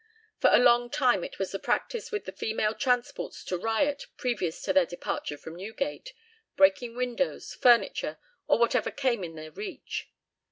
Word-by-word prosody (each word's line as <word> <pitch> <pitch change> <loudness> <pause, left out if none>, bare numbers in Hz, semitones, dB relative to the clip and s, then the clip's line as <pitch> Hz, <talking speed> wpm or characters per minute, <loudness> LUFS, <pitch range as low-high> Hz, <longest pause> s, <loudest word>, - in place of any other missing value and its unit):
For - - +5
a - - +8
long 240 0 +5
time 250 -9 +2
it - - -7
was 195 - -2
the 195 - -3
practice 470 -1 -2
with 420 -2 -3
the - - -5
female 220 -1 -1
transports 245 -1 -1
to 185 - -2
riot 225 +9 0
previous 205 -10 -1
to - - 0
their 280 -2 +5
departure 160 -3 -4
from 160 +3 -10
Newgate, 275 - -5 0.4
breaking 195 +5 +3
windows, 250 +2 -2
furniture, 240 -2 +3 0.3
or - - +4
whatever 235 0 +2
came 250 -7 0
in 165 -2 -6
their 155 0 -9
reach. 410 -3 -6
240 Hz, 165 wpm, -28 LUFS, 195-265 Hz, 0.4 s, a